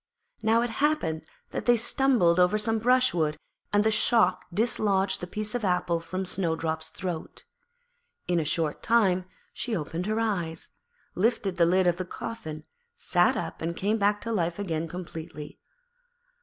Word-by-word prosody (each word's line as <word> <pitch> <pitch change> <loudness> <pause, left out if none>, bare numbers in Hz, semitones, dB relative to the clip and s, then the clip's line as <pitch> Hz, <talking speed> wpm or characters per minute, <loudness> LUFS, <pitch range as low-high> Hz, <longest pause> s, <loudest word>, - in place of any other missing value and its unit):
Now 225 +1 +3
it 240 - -2
happened 295 - 0 0.2
that - - -5
they 240 0 +6
stumbled 230 -7 +3
over 180 +4 +4
some 225 +1 0
brushwood, 225 -11 +2 0.3
and 205 0 +3
the 220 - +2
shock 215 -4 +4
dislodged 200 -2 +1
the 180 - -5
piece 210 +3 -3
of 245 -2 -2
apple 180 -2 +1
from 185 +3 -4
Snowdrop's 160 -3 -1
throat. 175 -3 -6 0.8
In 175 -1 +2
a - - 0
short 155 0 -1
time 195 -6 +2 0.3
she 235 -3 -3
opened 165 +4 -4
her 215 +1 0
eyes, 175 -8 -2 0.4
lifted 195 -2 0
the 170 -2 +4
lid 185 +2 +3
of 175 -1 +2
the 185 - -3
coffin, 160 -6 -7 0.3
sat - - +2
up - - -5
and 170 +1 -3
came 210 +3 0
back 205 +1 +2
to 230 - -4
life 175 -5 -1
again 165 -5 -2
completely. 160 -3 -8
185 Hz, 155 wpm, -27 LUFS, 170-220 Hz, 0.8 s, they